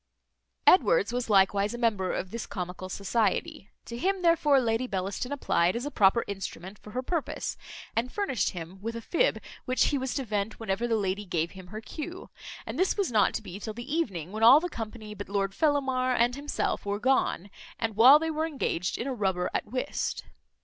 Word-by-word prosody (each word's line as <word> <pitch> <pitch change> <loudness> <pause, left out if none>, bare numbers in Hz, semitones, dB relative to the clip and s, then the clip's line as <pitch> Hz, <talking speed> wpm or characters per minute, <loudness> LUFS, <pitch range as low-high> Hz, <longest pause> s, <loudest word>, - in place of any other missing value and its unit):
Edwards 450 - +5
was 245 -1 -2
likewise 200 +2 +3
a - - -5
member 210 -6 +1
of 185 - -4
this 230 -1 -5
comical 180 -1 -5
society. 220 - -1 0.2
To 235 - -7
him 380 +3 0
therefore 315 -5 +4
Lady 235 0 0
Bellaston 195 +5 -3
applied 185 -10 +1
as 240 +3 -3
a 290 - -4
proper 205 +1 +4
instrument 195 -1 -7
for - - -13
her 255 - -2
purpose, 330 +3 -3 0.4
and 240 +3 0
furnished 400 - 0
him 180 +2 -8
with 230 +2 -4
a 230 - -5
fib, 430 - +1 0.3
which 255 0 +2
he 285 - 0
was 260 -1 -3
to 275 - -1
vent 210 0 -2
whenever 225 +1 -1
the 230 - +1
lady 200 -1 -1
gave 170 -3 -1
him 185 -2 -11
her 215 +4 -7
cue; 340 +9 -7 0.3
and 230 +7 -5
this 375 +2 +2
was 395 -9 0
not 215 -3 +3
to - - -3
be 185 -1 -8
till 215 0 -6
the 250 +6 -4
evening, 190 - -2
when 215 +1 -5
all 245 +6 +9
the 355 +2 -4
company 220 -4 -7
but 200 -1 -8
Lord 195 -1 -1
Fellamar 265 -3 +1
and 240 +1 +3
himself 285 +1 -2
were 200 0 -2
gone, 225 -6 +1 0.3
and 225 -2 -2
while 250 +7 +9
they 320 +1 -2
were 315 +1 -1
engaged 195 - -2
in 235 - -3
a 270 - -2
rubber 190 -5 -1
at - - -1
whist. 255 +4 -3
230 Hz, 205 wpm, -28 LUFS, 200-270 Hz, 0.4 s, all